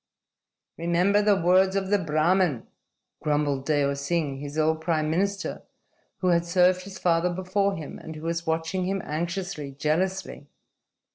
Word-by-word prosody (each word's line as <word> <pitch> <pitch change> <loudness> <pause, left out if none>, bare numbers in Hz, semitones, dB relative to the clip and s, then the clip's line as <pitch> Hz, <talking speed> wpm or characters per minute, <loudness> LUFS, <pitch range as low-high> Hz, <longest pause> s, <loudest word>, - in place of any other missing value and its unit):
"Remember 175 +5 +2
the 205 -2 +3
words 185 +3 +4
of 195 0 -1
the 205 - +4
Brahmin," 165 -3 +1 0.6
grumbled 145 -3 0
Deo 145 -2 +2
Singh, 140 0 -2
his 145 +2 -7
old 160 0 +1
prime 155 -2 0
minister 195 +4 -1 0.6
who 185 - +2
had 170 -1 +3
served 180 +1 +3
his 195 -1 -9
father 170 0 +2
before 190 +2 0
him 155 -4 -7
and 160 - -9
who 155 - -9
was 170 0 -3
watching 165 +3 -1
him 195 0 -2
anxiously, 170 -2 -4
jealously. 170 +7 -2
170 Hz, 145 wpm, -26 LUFS, 155-190 Hz, 0.6 s, words